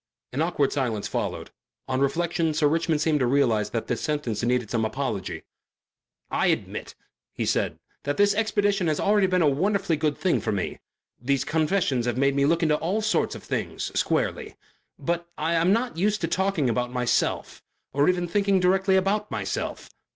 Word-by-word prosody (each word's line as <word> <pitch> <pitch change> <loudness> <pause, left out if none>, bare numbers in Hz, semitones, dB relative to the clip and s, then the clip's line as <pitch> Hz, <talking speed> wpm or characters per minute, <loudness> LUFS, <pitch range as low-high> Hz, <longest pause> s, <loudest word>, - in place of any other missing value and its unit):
An 140 - -1
awkward 160 -4 +1
silence 120 -7 -1
followed. - - -3 0.4
On 130 -1 -1
reflection 165 +2 0
Sir 155 -1 +3
Richmond 160 0 +1
seemed 155 -2 +2
to 125 - +2
realize 120 -5 +2
that 115 - -3
this 120 - -2
sentence 145 -9 -2
needed 120 -2 0
some 115 -2 +1
apology. 110 -3 -3 0.9
"I - - +1
admit," - - -2 0.4
he - - -2
said, - - 0 0.2
"that 145 0 -2
this 205 0 +4
expedition 205 -3 +1
has 155 -2 0
already 205 -1 +3
been 185 -2 +2
a - - +4
wonderfully 185 +4 +1
good 150 -1 0
thing 185 - +1
for - - -1
me. 100 -3 -3 0.4
These 135 +2 +1
confessions 155 -6 +1
have 120 0 -1
made 140 +1 +3
me 140 0 +2
look 165 +2 +2
into 150 -2 +3
all 195 +8 -1
sorts 215 - +1
of - - -10
things - - -3
squarely. - - -1 0.4
But 170 0 -2
I'm 165 +3 +2
not 235 -1 0
used 210 +4 +1
to 165 - 0
talking 190 -5 0
about 125 +1 0
myself 125 -1 -1 0.3
or 145 +3 +3
even 180 -1 0
thinking 200 +1 +2
directly 190 +1 +3
about 200 +3 +1
myself. - - -4
160 Hz, 175 wpm, -25 LUFS, 135-190 Hz, 0.9 s, this